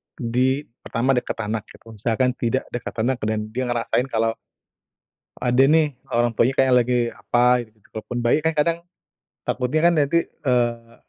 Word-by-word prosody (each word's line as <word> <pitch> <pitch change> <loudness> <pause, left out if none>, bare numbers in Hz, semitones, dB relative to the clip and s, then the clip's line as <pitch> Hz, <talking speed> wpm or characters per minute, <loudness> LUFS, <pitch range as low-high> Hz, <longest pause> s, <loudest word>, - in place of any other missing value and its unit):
di 130 +3 0 0.2
pertama 125 +3 0
dekat 125 -2 -1
anak 105 0 -3
gitu. 115 - -15
Misalkan 120 +3 +1
tidak 125 +2 0
dekat 120 - -5
anak, 130 0 0
dan 110 0 -2
dia 130 +2 -2
ngerasain 120 +1 0
kalau 115 -2 0 1.0
ada 125 +1 +2
nih, 155 -1 +3 0.2
orang 120 0 +1
tuanya 125 +4 +2
kayak 130 -1 +3
lagi 125 0 +1
apa 120 -1 +2
gitu. 110 - -32 0.2
Walaupun 120 +2 -5
bayi 120 +5 +4
kan 160 +1 0
kadang 165 +3 +2 0.7
takutnya 155 +7 +1
kan - - 0
nanti, 150 +3 +3
eee 120 -4 -1
125 Hz, 155 wpm, -22 LUFS, 115-135 Hz, 1.0 s, bayi